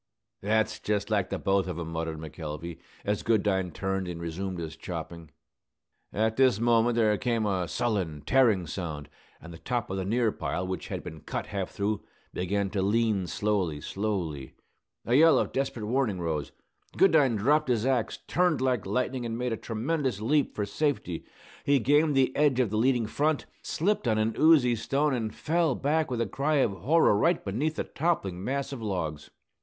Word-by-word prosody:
"That's 110 +2 +1
just 105 +1 -2
like 100 -4 +1
the - - -2
both 95 -1 +1
of 90 -3 -4
'em," 85 -1 -5
muttered 80 -1 -3
McElvey, 80 +1 -7 0.3
as 105 0 0
Goodine 100 -4 +1
turned 95 +1 -2
and 85 -1 -5
resumed 90 +3 -4
his 80 -2 -5
chopping. 85 -1 -7 0.8
At 110 +1 0
this 130 -6 +4
moment 115 0 +3
there 110 -2 +3
came 120 -4 0
a 95 -4 0
sullen, 90 -6 -2
tearing 115 -9 +3
sound; 80 -4 -5 0.3
and 85 +2 -11
the 80 - -11
top 120 -5 -2
of 95 - -2
the 95 - -1
near 115 +3 +1
pile, 90 - -3
which 95 0 -4
had - - -5
been 80 - -8
half 95 -2 -3
cut - - -19
through, 105 +1 -2 0.3
began 100 +2 -1
to 100 -1 -1
lean 105 -2 +1
slowly, 95 -3 -1
slowly. 85 -8 -3 0.5
A 120 - 0
yell 160 +5 +7
of - - 0
desperate 130 -5 -2
warning 120 -3 0
arose. 80 -5 -3 0.5
Goodine 150 -10 +5
dropped 145 +7 +2
his 120 -2 +1
axe, 130 -4 0
turned 180 -3 +2
like 125 -6 0
lightning, 125 +4 -1
and 115 -1 -3
made 125 -1 -1
a - - 0
tremendous 125 +1 -2
leap 140 +7 +1
for 105 - -1
safety. 110 - -2 0.4
He 140 0 +4
gained 145 +4 +3
the 130 -1 +2
edge 145 -3 +3
of 120 -6 +2
the 110 - 0
landing 125 -1 +2
front, 150 +7 0 0.2
slipped 190 -4 0
on 110 -2 +2
an 110 +1 0
oozy 145 -7 +5
stone, 140 +6 0
and 110 -3 -2
fell 160 +1 0
back 155 +2 0
with 120 -2 -1
a - - +1
cry 140 +9 0
of 135 -7 +3
horror 115 - +3
right 165 - +2
beneath 135 +11 -1
the - - -1
toppling 100 - -1
mass 140 +4 -2
of 130 - -6
logs. 85 -8 -3
110 Hz, 185 wpm, -28 LUFS, 95-130 Hz, 0.8 s, yell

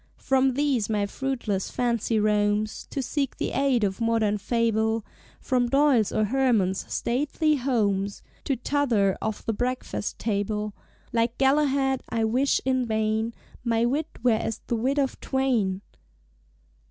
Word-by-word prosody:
From 265 -1 +2
these 275 -7 +1
my 210 -2 +1
fruitless 230 -4 -2
fancy 235 -2 0
roams 210 0 +1
To 275 - -3
seek 275 0 -2
the - - -2
Ade 270 -5 +2
of 195 +2 -1
Modern 225 -2 +1
Fable, 225 0 0 0.3
From 250 -2 0
Doyle's 275 -6 +3
or 215 - +1
Hemans' 220 -6 +1
"Stately 295 +5 0
Ho(l)mes," 205 -7 0 0.2
To 275 - +1
t'other 240 -8 +1
of 220 -1 -3
The 225 - 0
Breakfast 250 -2 -3
Table; 210 0 -2 0.4
Like 230 0 +1
Galahad, 270 -1 +2
I 230 -1 0
wish 250 +5 +2
(in 260 -2 +1
vain) 220 +1 0 0.3
"My 230 -1 +2
wit 290 +6 0 0.2
were 250 - +5
as 225 0 -1
the 235 - -1
wit 260 +5 0
of 275 -2 0
Twain!" 235 -8 0
235 Hz, 140 wpm, -26 LUFS, 215-265 Hz, 0.4 s, were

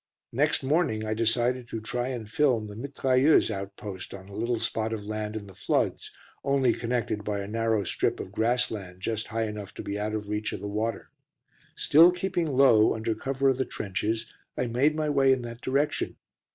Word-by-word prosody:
Next 145 +3 +2
morning 135 -7 +1
I 110 - -1
decided 120 +2 +1
to 115 - -4
try 120 +3 -2
and 120 -5 -4
film 125 -3 +2
the 105 -1 -8
mitrailleuse 135 +2 +3
outpost 100 -1 -6
on 95 0 -12
a - - -11
little 120 +3 0
spot 110 0 -1
of 105 -2 -4
land 110 0 -4
in 105 -2 -5
the 95 - -12
floods, - - -1 0.3
only 135 -3 +3
connected 115 -3 -2
by 105 -1 -2
a 100 - -5
narrow 110 -1 +1
strip - - 0
of 95 - -6
grass 115 +4 +1
land 90 -4 -7
just 110 +1 -2
high 115 0 -1
enough 105 -2 -6
to - - -6
be 100 +1 -3
out 105 +1 -2
of 105 -1 -4
reach 105 0 -2
of - - -4
the 100 - -5
water. 110 +2 -3 0.6
Still 165 +4 +6
keeping 180 -1 -1
low 115 -6 +6
under 110 0 -1
cover 135 +4 -1
of 130 - +1
the 130 - +1
trenches, 110 +3 -2 0.3
I 125 - 0
made 130 +6 +2
my 155 -1 0
way 135 -2 +4
in 130 -2 +2
that 120 0 -8
direction. 140 +3 0
115 Hz, 200 wpm, -27 LUFS, 105-130 Hz, 0.6 s, Still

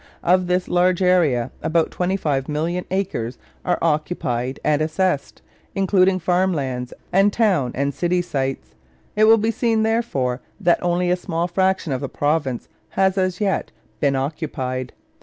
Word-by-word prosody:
Of 180 +1 +3
this 180 0 0
large 180 +1 +2
area 160 -10 +3
about 165 0 +1
25,000,000 165 -1 -1
acres 175 - -2 0.3
are 180 - +1
occupied 150 -6 -1
and 150 0 +2
assessed, 155 -1 -1 0.3
including 190 -1 +3
farm 185 +1 +1
lands 130 -3 -3 0.2
and 195 +2 +5
town 190 - +2
and 140 +1 0
city 175 +3 0
sites. 135 - -3 0.4
It 215 +1 +5
will 225 +1 +7
be 220 +1 +1
seen, 225 -1 +1
therefore, 140 - 0 0.2
that 175 0 +2
only 175 0 +1
a - - +4
small 175 -1 -2
fraction 185 -3 0
of 130 - -3
the 140 - -3
province 145 -4 -1 0.2
has, 190 -1 +2
as 185 -2 0
yet, 200 -2 0 0.3
been 140 -2 +2
occupied. 130 -3 -3
175 Hz, 145 wpm, -21 LUFS, 140-185 Hz, 0.4 s, will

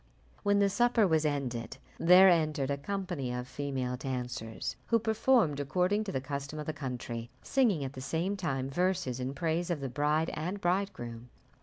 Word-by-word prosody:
When 205 0 +3
the 200 0 +4
supper 230 +2 +3
was 160 -4 +2
ended, 130 -5 -3 0.2
there 180 +3 +8
entered 155 -6 +2
a 140 - 0
company 175 -5 -3
of 125 0 -4
female 130 -3 -3
dancers, 125 -4 -4
who 230 - +4
performed, 220 - +2
according 180 +9 +1
to 195 - -3
the 135 - -1
custom 140 +2 -5
of 150 - -4
the 155 - -3
country, 125 -5 -5
singing 225 - +2
at 135 0 -4
the 130 - -7
same 165 +8 -1
time 135 -9 -2
verses 180 -5 0
in 130 +2 -3
praise 170 +2 -1
of 170 -4 -1
the 135 -1 -4
bride 150 +5 +1
and 180 +6 -3
bridegroom. 175 -11 -2
155 Hz, 175 wpm, -31 LUFS, 130-185 Hz, 0.2 s, there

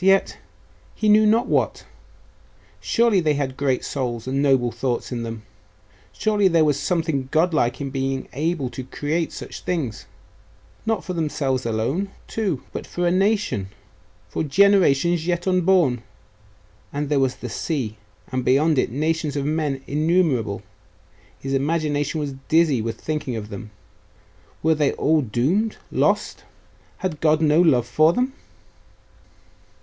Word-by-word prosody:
yet.... 195 0 +3 0.6
he 215 - -1
knew 215 +1 +6
not 230 +4 +3
what? - - 0 0.9
Surely 230 -4 +2
they 155 -4 +1
had 135 -2 -2
great 135 -2 0
souls 120 -5 -3
and 135 +2 -1
noble 135 -4 +3
thoughts 125 0 -2
in 120 -2 -3
them! 115 -1 -6 0.7
Surely 210 -2 +2
there 165 -3 +4
was 145 -2 +1
something 160 -7 -1
godlike 155 -6 +1
in 140 -2 -4
being 135 0 -2
able 155 -2 -1
to 130 +1 -6
create 150 +5 -2
such - - -8
things! 160 -11 -3 0.8
Not 225 -1 0
for 185 - -4
themselves 140 -6 -1
alone, 125 - -1 0.2
too; 195 - -2
but - - -5
for 175 - -2
a 175 - +3
nation 195 - +1 0.6
for - - -3
generations 170 -1 +3
yet 175 -1 0
unborn.... 180 -9 +3 0.9
And 145 +1 -2
there 145 -1 +2
was 130 -1 +1
the 125 - -7
sea.... 125 -3 -3 0.4
and 130 -1 -1
beyond 145 +3 +3
it, - - +1
nations 155 +3 -1
of 140 -1 -1
men 150 -3 -1
innumerable.... 145 - +1 0.7
His 135 0 -4
imagination 145 +1 0
was 145 -2 -3 0.2
dizzy 160 -7 +3
with 115 0 -4
thinking 150 -5 -3
of 105 -1 -6
them. 105 +1 -8 0.9
Were 160 +1 +4
they 150 -2 +1
all 155 +1 +2
doomed 145 - 0
lost?.... - - 0 0.5
Had 175 -5 -4
God 155 -1 +4
no 155 +1 +4
love 130 -9 +4
for 155 +7 +3
them? 255 +5 0
150 Hz, 145 wpm, -22 LUFS, 130-175 Hz, 0.9 s, knew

